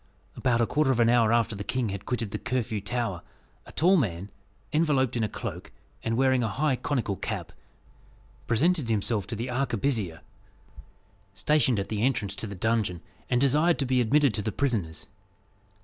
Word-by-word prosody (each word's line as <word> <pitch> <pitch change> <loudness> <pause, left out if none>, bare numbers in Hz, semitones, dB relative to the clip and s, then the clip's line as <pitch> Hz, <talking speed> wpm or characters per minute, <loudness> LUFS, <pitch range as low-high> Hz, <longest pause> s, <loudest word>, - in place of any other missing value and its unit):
About 120 -2 +1
a - - +4
quarter 150 +3 +1
of 130 -3 +2
an 115 -1 +5
hour 120 -2 +4
after 115 -2 +2
the 100 - -5
king 125 0 -1
had 100 0 -6
quitted 115 -3 -2
the - - -3
Curfew 125 -5 -2
Tower, 110 -4 -2 0.5
a - - -11
tall 185 +4 +4
man, 95 - -2 0.4
enveloped 140 -6 +2
in 115 - 0
a 110 - 0
cloak, - - -6 0.3
and 115 0 -1
wearing 130 -1 +3
a 115 - +1
high 135 +6 +1
conical 120 -6 -1
cap, - - -5 0.9
presented 150 +3 +2
himself 105 -2 0
to 115 - -4
the 120 +3 -4
arquebusier 115 - -1 1.1
stationed 140 -7 +2
at 100 - -4
the 105 -1 -2
entrance 115 -5 0
to 110 - -4
the 100 - -7
dungeon, 105 -4 0 0.3
and 125 - +2
desired 150 +6 +3
to 140 - -1
be 125 -1 +2
admitted 140 +2 +3
to 105 - -2
the 110 +1 -2
prisoners. 105 - -1
120 Hz, 180 wpm, -27 LUFS, 105-130 Hz, 1.1 s, an